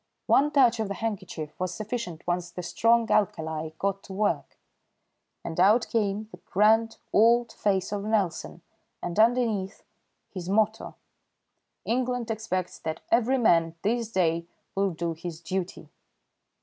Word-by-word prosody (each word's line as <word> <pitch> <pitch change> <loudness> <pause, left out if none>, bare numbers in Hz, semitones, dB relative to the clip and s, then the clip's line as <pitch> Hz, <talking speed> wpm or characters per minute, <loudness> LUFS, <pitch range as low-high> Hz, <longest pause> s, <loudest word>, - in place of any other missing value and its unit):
One 285 +2 +4
touch 250 -5 +4
of 220 - 0
the 200 - -4
handkerchief 190 -9 -4
was 180 -1 -2
sufficient 215 -6 -5
once 175 0 -1
the 180 +1 -7
strong 230 +6 +2
alkali 160 -6 0
got 195 +1 -1
to 195 - -9
work, 205 +2 -1 0.9
and 165 0 -5
out 215 +6 +5
came 210 -1 0
the - - -11
grand 220 +5 +2 0.2
old 235 +2 +4
face 195 -2 0
of 205 -1 -2
Nelson 195 -5 -1 0.4
and 175 +4 -3
underneath 220 -4 +2 0.5
his 185 -2 -6
motto: 215 +2 +1 0.9
"England 245 -1 -1
expects 185 -5 -3
that 160 -1 -4
every 245 +3 +3
man 165 -8 +3
this 230 +1 0
day 170 -4 +1 0.3
will 195 0 +1
do 170 -1 -3
his 165 0 -7
duty." 180 +2 -4
200 Hz, 135 wpm, -27 LUFS, 175-225 Hz, 0.9 s, out